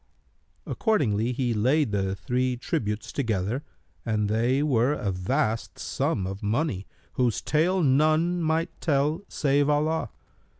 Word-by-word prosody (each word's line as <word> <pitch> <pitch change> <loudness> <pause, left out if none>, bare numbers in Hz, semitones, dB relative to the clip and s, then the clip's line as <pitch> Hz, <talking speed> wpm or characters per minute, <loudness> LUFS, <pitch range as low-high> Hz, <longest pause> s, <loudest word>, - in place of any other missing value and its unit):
[FN#296]" - - -7
Accordingly 120 - +1
he 125 -1 0
laid 130 +4 +2
the 95 -1 0
three 125 +5 -1
tributes 105 -3 -3
together 115 0 -1 0.4
and 105 -2 0
they 120 +6 +2
were 130 -2 +2
a 100 -8 -2
vast 110 +5 -1
sum 95 - -1
of 95 +1 -5
money, 105 - -1 0.3
whose 125 -3 +1
tale 175 +4 +1
none 155 +5 +3
might 165 +2 0
tell 150 +2 +1
save 145 0 +1
Allah. 155 +2 +1
130 Hz, 130 wpm, -26 LUFS, 110-155 Hz, 0.4 s, none